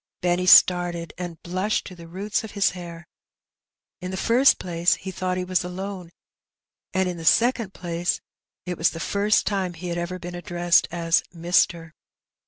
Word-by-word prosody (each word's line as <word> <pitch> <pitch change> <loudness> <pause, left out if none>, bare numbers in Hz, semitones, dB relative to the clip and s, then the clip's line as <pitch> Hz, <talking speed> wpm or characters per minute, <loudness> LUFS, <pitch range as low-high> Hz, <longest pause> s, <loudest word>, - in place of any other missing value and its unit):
'' - - -64
Benny 180 +1 +1
started, 175 -2 +5
and 175 -3 -6
blushed 185 +5 -1
to 185 - -9
the 170 -1 -12
roots 200 +6 -3
of 220 - -9
his 200 -1 +2
hair 170 -1 -9 0.9
In 180 - -5
the 190 - -4
first 245 +7 +4
place 175 -1 +1
he 190 - -7
thought 185 0 -2
he 185 - -2
was 180 -1 0
alone, 185 0 -6 0.8
and 190 0 0
in 180 -1 -4
the 165 - -8
second 230 +2 +2
place 175 0 -2 0.5
it 180 -2 -5
was 165 - +4
the 165 - -8
first 205 +4 +1
time 190 -3 -1
that - - -15
he 180 +2 -6
had 170 0 -2
ever 175 +1 -4
been 175 0 -8
addressed 175 0 +1
as 165 0 +1
'^mister." 170 -1 +1
180 Hz, 185 wpm, -24 LUFS, 170-190 Hz, 0.9 s, started